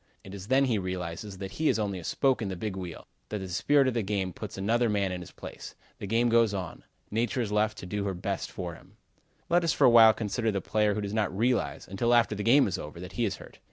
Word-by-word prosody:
It 95 - -10
is 100 -1 -8
then 135 +3 +4
he 115 -5 +1
realizes 90 +1 -5
that 95 0 -6
he 155 +6 0
is - - +2
only 100 -3 -2
a - - -10
spoke 135 - +1
in 105 - -2
the 95 - -4
big 100 +2 -4
wheel; 90 -3 -7 0.2
that 105 - -3
the 95 -2 -6
spirit 135 +10 +3
of 130 - +1
the 115 - 0
game 95 -3 -2
puts 105 -3 -8
another 115 +5 +1
man 100 -2 0
in 90 -1 -4
his 90 - -9
place. - - -10 0.2
The 100 - -5
game 115 +4 +2
goes 115 -3 +3
on. 90 -4 -6 0.3
Nature 115 +3 0
is 110 -3 -3
left 105 +1 +1
to - - -8
do 100 +2 -3
her 95 -2 -2
best 95 +2 -3
for 90 -2 -5
him. 80 - -17 0.5
Let 175 +1 +3
us 165 - +2
for - - +3
a 125 - +7
while 115 -2 +8
consider 110 +1 -1
the 100 - -1
player 105 +2 +1
who 105 - -2
does 100 0 -4
not 105 -4 -1
realize, 120 +3 0
until 115 +6 +1
after 115 -2 +3
the 105 - -4
game 130 +6 +5
is 95 - -3
over, 75 +3 -8
that 90 +1 -8
he 120 - -1
is 100 -2 -1
hurt. - - -14
105 Hz, 270 wpm, -28 LUFS, 95-115 Hz, 0.5 s, while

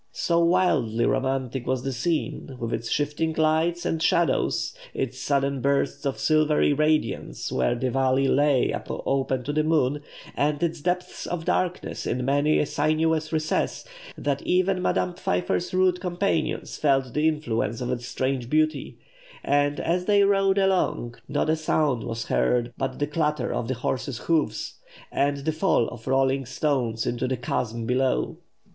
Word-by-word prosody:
So 170 0 +1
wildly 170 -11 +2
romantic 130 -1 -1
was 130 -1 0
the 135 - -2
scene, 140 -1 -2
with 115 0 -3
its 115 - -3
shifting 150 +2 0
lights 160 +2 +1
and 160 - -1
shadows, 170 +1 +1 0.2
its 130 -1 -3
sudden 140 -1 0
bursts 140 +1 0
of 135 - -2
silvery 155 -1 +3
radiance 150 -6 0
where 120 - +1
the 125 +1 -1
valley 135 +1 +2
lay 140 -1 +3 0.2
open 135 -1 -1
to 145 - -3
the 155 0 +2
moon, 150 -3 +1 0.3
and 145 +2 0
its 165 -2 -1
depths 180 +2 -2
of 170 -2 -4
darkness 180 -1 -1
in 125 0 -1
many 145 +3 +2
a - - +2
sinuous 155 +2 0
recess, 155 - -1 0.3
that 140 -1 -1
even 185 +1 +1
Madame 180 - 0
Pfeiffer's 90 - -1
rude 185 -1 +2
companions 180 -3 -1
felt 135 -4 +1
the 150 +1 +2
influence 120 -8 -1
of 125 0 -2
its 120 -1 -3
strange 130 -2 -2
beauty; 155 0 0 0.5
and, 145 0 +1
as 180 +2 0
they 205 0 +4
rode 195 -1 +3
along, 190 -11 +1 0.2
not - - 0
a 155 - +3
sound 155 -5 +1
was 115 0 -4
heard 120 - +1
but 135 -1 -3
the 145 - 0
clatter 150 0 -1
of 115 - -2
the 130 - -1
horses' 130 +1 -3
hoofs, 165 +2 -1 0.3
and 140 0 0
the 160 - +2
fall 155 -7 +2
of 110 - -11
rolling 135 0 +2
stones 125 -4 -1
into 120 +2 -1
the 130 0 -1
chasm 115 -1 -2
below. 130 +2 0
145 Hz, 160 wpm, -25 LUFS, 130-160 Hz, 0.5 s, they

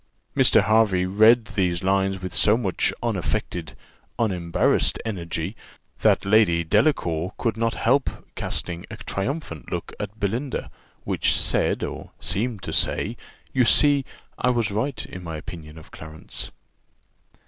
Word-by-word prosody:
Mr. - - +5
Hervey 105 -4 +3
read 110 +5 +5
these 90 -5 -1
lines 95 0 +1
with 95 -1 -5
so 105 +2 +4
much 100 -8 0
unaffected, 85 -4 -2 0.4
unembarrassed 90 -7 +1
energy, 85 -2 -4 0.4
that - - +3
Lady 100 -5 +4
Delacour 85 - +1
could 115 -3 -1
not 115 0 -1
help 135 +4 +2 0.2
casting 85 0 -4
a 110 - -8
triumphant 100 - -4
look - - -4
at 105 +1 -6
Belinda, 120 +7 -2 0.3
which - - +1
said - - +1
or - - -6
seemed 105 +3 -1
to - - -4
say - - +1 0.4
you 130 - +4
see 140 +4 +5 0.4
I 125 - +2
was 120 -4 +1
right 125 +7 -2
in 90 - -9
my 80 -2 -5
opinion 80 0 -9
of 80 - -14
Clarence! 80 0 -7
100 Hz, 135 wpm, -24 LUFS, 85-115 Hz, 0.4 s, Mr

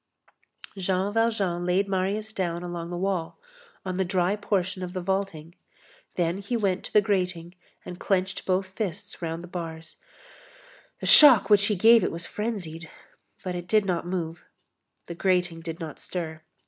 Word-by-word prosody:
Jean 190 +1 -1
Valjean 210 -6 0
laid 180 +3 +1
Marius 200 +3 -2
down 175 -4 -2
along 175 -1 -5
the 175 - -4
wall, 185 -3 -2 0.5
on 185 -1 -3
the 190 - +2
dry 185 +1 +1
portion 195 -2 -1
of 180 -1 -5
the 185 - -3
vaulting, 180 -3 -3 0.6
then 175 +1 0
he 220 +5 -2
went 195 -4 0
to - - -8
the 210 - +5
grating 180 -4 -1 0.3
and 180 0 -8
clenched 190 0 -1
both 190 +1 +1
fists 200 0 -5
round 165 0 -4
the - - -9
bars; 165 -2 -7 1.0
the - - -4
shock 260 -8 +8
which 205 -1 +6
he 210 - +1
gave 225 +4 +6
it - - 0
was 170 +1 -5
frenzied, 175 -8 -5 0.5
but 185 - -3
it 175 0 -6
did 215 +1 +3
not 175 -2 -1
move. 170 -2 -4 0.6
The 170 - -6
grating 180 -1 0
did 165 +1 -6
not 160 -3 -7
stir. 160 -3 -5
185 Hz, 165 wpm, -26 LUFS, 170-200 Hz, 1.0 s, shock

